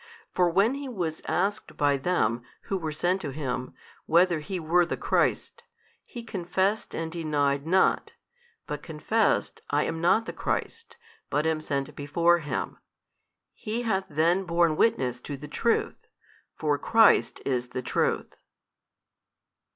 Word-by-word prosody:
For 180 Hz, -1 st, +2 dB
when 200 Hz, +8 st, +3 dB
he 280 Hz, -1 st, -5 dB
was 170 Hz, -9 st, -3 dB
asked 200 Hz, +4 st, -1 dB
by 145 Hz, -1 st, +3 dB
them 130 Hz, -6 st, 0 dB, 0.2 s
who 195 Hz, -, -3 dB
were 160 Hz, -2 st, -3 dB
sent 180 Hz, +5 st, 0 dB
to 145 Hz, -, -3 dB
him, 130 Hz, -3 st, -4 dB, 0.3 s
whether 170 Hz, 0 st, +4 dB
he 185 Hz, +4 st, -4 dB
were 170 Hz, +2 st, +3 dB
the 170 Hz, -, -3 dB
Christ, -, -, 0 dB, 0.4 s
he 240 Hz, -, -9 dB
confessed 190 Hz, 0 st, -1 dB
and 165 Hz, 0 st, -3 dB
denied 145 Hz, -3 st, 0 dB
not, 190 Hz, +2 st, +2 dB, 0.5 s
but 150 Hz, -, -5 dB
confessed 195 Hz, +8 st, 0 dB
I 145 Hz, +1 st, +2 dB
am 165 Hz, 0 st, -3 dB
not 200 Hz, +6 st, +3 dB
the -, -, -5 dB
Christ, 455 Hz, 0 st, -4 dB, 0.3 s
but 150 Hz, +1 st, 0 dB
am 160 Hz, -1 st, 0 dB
sent 140 Hz, -3 st, -3 dB
before 170 Hz, +4 st, +2 dB
Him. 145 Hz, -5 st, -4 dB, 0.7 s
He 225 Hz, +3 st, -4 dB
hath 195 Hz, -4 st, 0 dB
then 165 Hz, +5 st, +2 dB
borne 170 Hz, -2 st, +2 dB
witness 130 Hz, -, +1 dB
to 145 Hz, +1 st, -6 dB
the 150 Hz, +2 st, -9 dB
Truth, 230 Hz, +10 st, -1 dB, 0.5 s
for 150 Hz, -2 st, 0 dB
Christ 225 Hz, +7 st, +4 dB
is 125 Hz, -2 st, -1 dB
the 125 Hz, +1 st, -5 dB
Truth. -, -, -1 dB
165 Hz, 145 wpm, -27 LUFS, 145-190 Hz, 0.7 s, whether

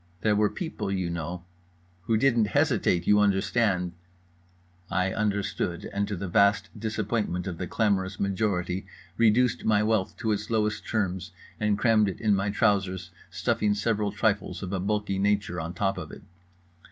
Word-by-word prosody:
There 105 Hz, +2 st, +3 dB
were 105 Hz, 0 st, +3 dB
people, 160 Hz, -, -4 dB
you 95 Hz, -3 st, -1 dB
know… 85 Hz, +1 st, -5 dB, 0.6 s
who 110 Hz, -, +2 dB
didn't 120 Hz, -2 st, +3 dB
hesitate, 85 Hz, -1 st, +2 dB
you 105 Hz, 0 st, +5 dB
understand…. 100 Hz, -2 st, +2 dB, 1.0 s
I 95 Hz, +1 st, 0 dB
understood, 100 Hz, -2 st, -1 dB
and 100 Hz, 0 st, 0 dB
to 105 Hz, -, -3 dB
the 95 Hz, +2 st, -4 dB
vast 100 Hz, +4 st, +3 dB
disappointment 105 Hz, -4 st, -2 dB
of 90 Hz, -3 st, -5 dB
the 90 Hz, -, -3 dB
clamorous 95 Hz, -1 st, 0 dB
majority 95 Hz, -2 st, -1 dB, 0.3 s
reduced 115 Hz, +2 st, +3 dB
my 105 Hz, -1 st, +3 dB
wealth 110 Hz, -3 st, 0 dB
to 110 Hz, -, -1 dB
its 105 Hz, 0 st, -2 dB
lowest 105 Hz, -2 st, 0 dB
terms 95 Hz, -5 st, -2 dB, 0.3 s
and 105 Hz, -1 st, +1 dB
crammed 110 Hz, -2 st, +3 dB
it 95 Hz, -, -6 dB
in 110 Hz, -2 st, +2 dB
my 95 Hz, +1 st, 0 dB
trousers, 95 Hz, -5 st, 0 dB, 0.2 s
stuffing 105 Hz, -1 st, 0 dB
several 105 Hz, -1 st, 0 dB
trifles 105 Hz, -1 st, -1 dB
of 95 Hz, 0 st, -4 dB
a 95 Hz, -, 0 dB
bulky 100 Hz, 0 st, -1 dB
nature 100 Hz, -3 st, 0 dB
on 85 Hz, +2 st, -6 dB
top 95 Hz, 0 st, 0 dB
of 80 Hz, -4 st, -7 dB
it. -, -, -11 dB
100 Hz, 160 wpm, -27 LUFS, 95-105 Hz, 1.0 s, you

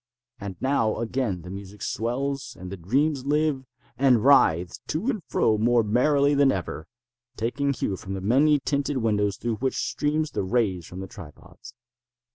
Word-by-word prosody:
And 100 Hz, -2 st, -6 dB
now 130 Hz, -5 st, +1 dB
again 115 Hz, -6 st, -2 dB
the 90 Hz, -, -8 dB
music 100 Hz, +1 st, -9 dB
swells, 130 Hz, +3 st, -3 dB
and 90 Hz, 0 st, -8 dB
the -, -, -4 dB
dreams 135 Hz, -, 0 dB
live, 150 Hz, -2 st, +1 dB, 0.3 s
and 130 Hz, -5 st, +4 dB
writhe 90 Hz, -, +4 dB
to 200 Hz, -, -1 dB
and 215 Hz, -, -5 dB
fro 110 Hz, -1 st, +2 dB
more 120 Hz, +1 st, +3 dB
merrily 140 Hz, +6 st, +3 dB
than 140 Hz, -1 st, +4 dB
ever, 85 Hz, -5 st, -4 dB, 0.5 s
taking 140 Hz, +5 st, -1 dB
hue 115 Hz, -7 st, -2 dB
from 95 Hz, +1 st, -6 dB
the -, -, -4 dB
many 140 Hz, +9 st, +4 dB
tinted 140 Hz, 0 st, -1 dB
windows 105 Hz, -4 st, 0 dB
through 115 Hz, -2 st, -2 dB
which 130 Hz, +2 st, -1 dB
stream 155 Hz, +1 st, 0 dB
the -, -, -1 dB
rays 95 Hz, -4 st, 0 dB
from 90 Hz, +1 st, -8 dB
the 95 Hz, -, -6 dB
tripods. 90 Hz, +9 st, -13 dB
120 Hz, 165 wpm, -25 LUFS, 100-140 Hz, 0.5 s, and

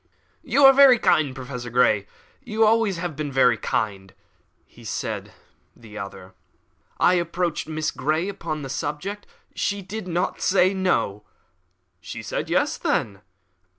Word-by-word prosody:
"You 280 Hz, 0 st, +3 dB
are 270 Hz, -, +9 dB
very 270 Hz, -2 st, +7 dB
kind, 145 Hz, -, +2 dB
Professor 125 Hz, -2 st, -7 dB
Grey 110 Hz, -4 st, +2 dB, 0.4 s
you 220 Hz, -2 st, -4 dB
have 215 Hz, -, +7 dB
always 220 Hz, -4 st, +2 dB
been 150 Hz, -2 st, -5 dB
very 125 Hz, -2 st, +4 dB
kind," 100 Hz, -3 st, -3 dB, 0.7 s
said -, -, -4 dB, 0.4 s
the 110 Hz, -3 st, -14 dB
other. 100 Hz, -2 st, -8 dB, 0.7 s
"I 180 Hz, -, +5 dB
approached 170 Hz, -2 st, -1 dB
Miss 155 Hz, 0 st, -2 dB
Grey 155 Hz, +5 st, -1 dB
upon 165 Hz, -6 st, -5 dB
the 135 Hz, -, -6 dB
subject; 160 Hz, +9 st, -4 dB, 0.3 s
she 200 Hz, -1 st, -2 dB
did 200 Hz, +1 st, -7 dB
not 175 Hz, 0 st, -2 dB
say 185 Hz, 0 st, +3 dB
No." 180 Hz, -, 0 dB, 0.8 s
"She 85 Hz, -, -8 dB
said -, -, -4 dB
Yes, -, -, +1 dB
then?" 100 Hz, -2 st, -1 dB
155 Hz, 135 wpm, -23 LUFS, 125-195 Hz, 0.8 s, are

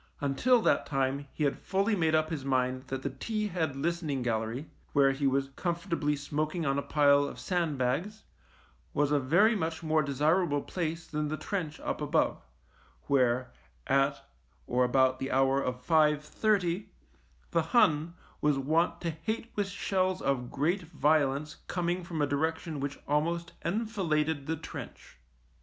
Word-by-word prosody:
Until 220 Hz, -, +3 dB
that -, -, +2 dB
time 135 Hz, 0 st, -1 dB
he 155 Hz, -, -3 dB
had 140 Hz, -, 0 dB
fully 200 Hz, +3 st, +1 dB
made 160 Hz, -4 st, +2 dB
up 155 Hz, +1 st, +1 dB
his 150 Hz, -4 st, -3 dB
mind 130 Hz, -1 st, 0 dB
that 135 Hz, 0 st, -4 dB
the 140 Hz, -, -2 dB
T 210 Hz, -, -3 dB
head 160 Hz, -6 st, -1 dB
listening 155 Hz, -2 st, -1 dB
gallery, 115 Hz, +4 st, -2 dB, 0.3 s
where 140 Hz, -2 st, +5 dB
he 135 Hz, +1 st, 0 dB
was 135 Hz, 0 st, +1 dB
comfortably 170 Hz, -4 st, -1 dB
smoking 155 Hz, +3 st, -2 dB
on 135 Hz, 0 st, +1 dB
a -, -, -1 dB
pile 145 Hz, -1 st, +4 dB
of -, -, -7 dB
sandbags, 170 Hz, -, -1 dB, 0.7 s
was 145 Hz, 0 st, +2 dB
a 145 Hz, -, +4 dB
very 175 Hz, -, +4 dB
much 160 Hz, -3 st, -2 dB
more 155 Hz, 0 st, +2 dB
desirable 150 Hz, +2 st, +1 dB
place 165 Hz, -2 st, -3 dB
than 150 Hz, 0 st, -2 dB
the 155 Hz, +1 st, -3 dB
trench 165 Hz, -7 st, -4 dB
up -, -, -3 dB
above, -, -, +1 dB, 0.6 s
where, 125 Hz, -2 st, +2 dB, 0.3 s
at 135 Hz, 0 st, +1 dB, 0.4 s
or 125 Hz, +1 st, +2 dB
about 130 Hz, +1 st, +3 dB
the 135 Hz, -, -3 dB
hour 135 Hz, +1 st, +3 dB
of 125 Hz, -1 st, -2 dB
five 150 Hz, 0 st, +3 dB
thirty, 195 Hz, +1 st, 0 dB, 0.6 s
the 170 Hz, -, +3 dB
Hun 160 Hz, -3 st, +2 dB, 0.3 s
was 150 Hz, -2 st, +3 dB
wont 160 Hz, +6 st, +1 dB
to 170 Hz, -, -1 dB
hate 220 Hz, +9 st, -4 dB
with 205 Hz, -2 st, 0 dB
shells 185 Hz, -1 st, 0 dB
of 125 Hz, -3 st, -1 dB
great 165 Hz, +8 st, 0 dB
violence 150 Hz, -2 st, +1 dB
coming 175 Hz, 0 st, -1 dB
from 165 Hz, -4 st, -2 dB
a -, -, +4 dB
direction 160 Hz, +2 st, -2 dB
which 140 Hz, +1 st, -3 dB
almost 170 Hz, +4 st, 0 dB
enfiladed 165 Hz, -8 st, -1 dB
the 160 Hz, -, 0 dB
trench. 160 Hz, -, -9 dB
150 Hz, 155 wpm, -30 LUFS, 135-170 Hz, 0.7 s, where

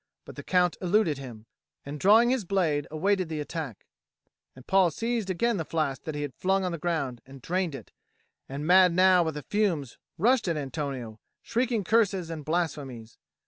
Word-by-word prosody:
But -, -, -11 dB
the -, -, -7 dB
Count 180 Hz, -2 st, +1 dB
eluded 180 Hz, -5 st, +2 dB
him, 120 Hz, -5 st, -10 dB, 0.4 s
and 145 Hz, +1 st, -6 dB
drawing 220 Hz, -, +5 dB
his 260 Hz, -4 st, 0 dB
blade 165 Hz, -6 st, 0 dB
awaited 185 Hz, +3 st, 0 dB
the 155 Hz, -1 st, -3 dB
attack; 150 Hz, -, -6 dB, 0.7 s
and 130 Hz, 0 st, -14 dB
Paul 190 Hz, -2 st, +4 dB
seized 225 Hz, +4 st, -2 dB
again 230 Hz, +5 st, +1 dB
the 165 Hz, -, -2 dB
flask 155 Hz, -4 st, -2 dB
that 155 Hz, -, -4 dB
he 145 Hz, -, -3 dB
had 145 Hz, -3 st, -5 dB
flung 190 Hz, +1 st, 0 dB
on 180 Hz, -, -1 dB
the 170 Hz, -, -5 dB
ground, 145 Hz, -7 st, -2 dB
and 135 Hz, +1 st, -13 dB
drained 175 Hz, +2 st, -2 dB
it, 120 Hz, -7 st, -11 dB, 0.6 s
and 140 Hz, +2 st, -5 dB
mad 180 Hz, +1 st, +6 dB
now 185 Hz, 0 st, +5 dB
with 160 Hz, -3 st, -2 dB
the 150 Hz, -, -6 dB
fumes 175 Hz, -, -1 dB, 0.2 s
rushed 235 Hz, +4 st, +3 dB
at 165 Hz, -2 st, 0 dB
Antonio, 135 Hz, -6 st, -5 dB, 0.2 s
shrieking 235 Hz, -2 st, 0 dB
curses 195 Hz, -4 st, +1 dB
and 155 Hz, -2 st, -6 dB
blasphemies. 145 Hz, -8 st, -3 dB
170 Hz, 185 wpm, -27 LUFS, 145-190 Hz, 0.7 s, mad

